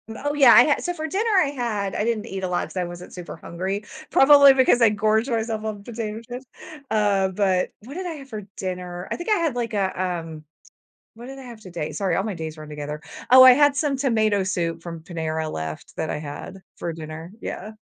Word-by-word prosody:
Oh, 290 +4 -2
yeah, 275 -5 +7
I - - +9
had 295 - +1
so, 355 - -1
for 315 -2 -5
dinner, 405 +8 -1
I 280 - -1
had 225 -8 -2
I 210 - -1
didn't 230 -2 -1
eat 190 0 -5
a - - 0
lot 180 -1 -1
'cause - - -11
I 180 - 0
wasn't 175 +1 -9
super 180 -1 -8
hungry, 190 +4 -4 0.3
probably 280 0 +8
because 260 -2 +4
I 230 - +7
gorge 215 +3 +1
myself 225 -2 -2
on 210 -2 -5
potato 220 -1 -5
chips. 245 +3 -9 0.4
Uh, 205 -3 +2
but 190 -1 0
what 255 +7 -11
did 370 +1 -4
I 350 - -3
have 275 -3 -11
for 215 -3 -6
dinner? 180 -1 -5
I - - -1
think 345 - -6
I - - +5
had, 330 -8 0
like, 235 -2 -3
a, 190 -3 -1
um 165 -4 -4 0.7
what 235 +2 -10
did 270 +1 -9
I - - -9
have 240 -3 -11
today? 175 -6 -6
Sorry, 190 -5 -1
all 195 - 0
my 210 -2 -3
days 160 -2 -6
run 155 0 -9
together 150 0 -6 0.3
oh, 255 +1 +10
I 255 - +10
had 290 +2 +4
some 285 -1 0
tomato 220 -7 +1
soup 170 -3 -2
from 170 -1 -7
Panera 160 -2 -3
left 80 0 -6
that 160 - -2
I - - -2
had 150 +5 -8
for 170 - -4
dinner. 160 +1 -8
Yeah. 215 +3 -6
210 Hz, 230 wpm, -23 LUFS, 175-250 Hz, 0.7 s, oh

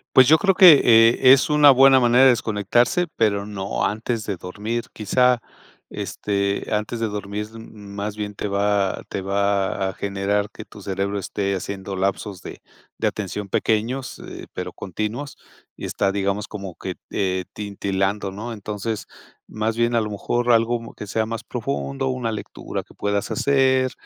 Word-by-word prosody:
Pues, 130 -1 +8
yo 160 +3 +7
creo 195 -2 +3
que, 175 -7 +9
eh, 115 +2 +6
es 135 - +3
una 150 -1 +6
buena 135 0 +7
manera 120 +1 +5
de 135 - +8
desconectarse, 120 - +1
pero 100 -3 +1
no 100 -2 -3
antes 110 +1 -2
de 100 - -2
dormir. 105 +7 -4
Quizá, 125 +3 +2 0.5
este, 100 -1 -2
antes 105 +2 -2
de 115 - 0
dormir, 105 0 -4
más 105 -2 -7
bien 105 -1 -4
te 105 - -4
va 100 -1 0
te 100 - -3
va 100 0 0
a - - -6
generar 100 +1 -1
que 110 - -10
tu 105 - -14
cerebro 100 +1 -2
esté 100 0 -2
haciendo 95 +1 -5
lapsos 95 0 -2
de - - -10 0.4
de - - 0
atención 105 0 -4
pequeños, 115 +6 -1
eh, - - -9
pero - - -5
continuos, 110 - -5 0.4
y - - -7
está, 100 - 0
digamos, 100 +1 -1
como 100 -3 -7
que, - - -6 0.2
eh, 95 -2 -1
titilando 100 -1 -2
¿no?, 110 +5 -6
entonces, 105 +1 -4 0.4
más 110 +1 -2
bien 120 0 +2
a 115 - +3
lo 105 - -3
mejor 120 +4 0
algo 115 0 +1
que - - -7
sea 110 +2 0
más 115 -1 -5
profundo, 70 - -3
una 125 -3 -2
lectura 105 - -6
que - - -20
puedas 100 -1 -1
hacer 130 -2 +2
105 Hz, 165 wpm, -22 LUFS, 100-120 Hz, 0.5 s, que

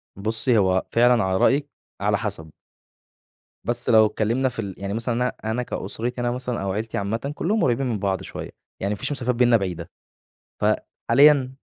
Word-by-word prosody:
بُصّي، 110 +4 +1
هو 95 -2 +2
فعلًا 120 -2 +4
على 95 0 0
رأيِك 140 +6 +2 0.3
على - - +2
حسب. 80 -1 -5 1.1
بس 120 0 0
لو 110 -2 +7
اتكلمنا 115 +5 0
في 115 - -9
ال 100 -3 -4
يعني 100 +1 -4
مثلًا 115 +2 -1
أنا 125 +1 0 0.2
أنا 125 +2 -1
كأسرتي 120 +1 -4
أنا 120 0 0
مثلًا 125 -1 -3
أو 95 0 -2
عيلتي 110 +3 -3
عامةً، 115 +8 -2
كلّهم 210 +8 0
قريبين 125 +2 +1
من 110 -4 -2
بعض 95 -1 -1
شوية، - - -7 0.3
يعني 100 +2 -1
ما - - -5
فيش - - -3
مسافات 125 -3 -1
بيننا 120 -1 +4
بعيدة، 90 -5 -5 0.7
فحاليًا 135 +1 +3
115 Hz, 175 wpm, -23 LUFS, 100-125 Hz, 1.1 s, لو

